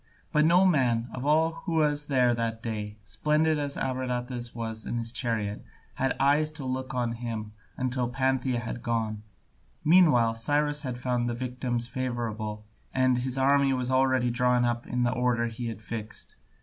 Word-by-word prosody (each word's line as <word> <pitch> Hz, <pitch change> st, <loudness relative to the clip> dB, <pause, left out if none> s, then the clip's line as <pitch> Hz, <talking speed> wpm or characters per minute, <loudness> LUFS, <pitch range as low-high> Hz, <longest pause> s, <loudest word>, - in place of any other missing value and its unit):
But 150 Hz, -1 st, +4 dB
no 175 Hz, +4 st, +5 dB
man, 125 Hz, -9 st, +2 dB
of 130 Hz, +2 st, -4 dB
all 160 Hz, +2 st, +4 dB, 0.2 s
who 170 Hz, -, 0 dB
was 150 Hz, -2 st, +1 dB
there 125 Hz, -3 st, +3 dB
that 115 Hz, -1 st, -2 dB
day, 105 Hz, -2 st, -4 dB
splendid 155 Hz, +7 st, +1 dB
as 145 Hz, -1 st, -2 dB
Abradatas 125 Hz, -2 st, -3 dB
was 110 Hz, -1 st, -4 dB
in 120 Hz, -, -2 dB
his 115 Hz, -1 st, -2 dB
chariot, 110 Hz, -4 st, -2 dB, 0.3 s
had 135 Hz, 0 st, 0 dB
eyes 145 Hz, +3 st, +3 dB
to 150 Hz, -4 st, -6 dB
look 130 Hz, 0 st, -3 dB
on 120 Hz, -2 st, 0 dB
him 115 Hz, -2 st, -5 dB, 0.3 s
until 125 Hz, -1 st, -1 dB
Pantheia 130 Hz, 0 st, 0 dB
had 120 Hz, 0 st, -5 dB
gone. 110 Hz, -2 st, -1 dB, 0.6 s
Meanwhile 150 Hz, -9 st, +5 dB
Cyrus 145 Hz, +5 st, +1 dB
had 130 Hz, -5 st, -4 dB
found 125 Hz, -1 st, -1 dB
the 120 Hz, -, -2 dB
victims 125 Hz, -1 st, -3 dB
favourable, 115 Hz, -4 st, -3 dB, 0.3 s
and 130 Hz, -1 st, +2 dB
his 130 Hz, +1 st, -1 dB
army 140 Hz, 0 st, +4 dB
was 125 Hz, 0 st, 0 dB
already 130 Hz, -2 st, +3 dB
drawn 125 Hz, 0 st, +3 dB
up 120 Hz, 0 st, -1 dB
in 125 Hz, 0 st, 0 dB
the 120 Hz, -, +2 dB
order 125 Hz, -1 st, +1 dB
he 115 Hz, +1 st, -4 dB
had 110 Hz, -1 st, -6 dB
fixed. 110 Hz, -1 st, -6 dB
125 Hz, 170 wpm, -28 LUFS, 115-135 Hz, 0.6 s, no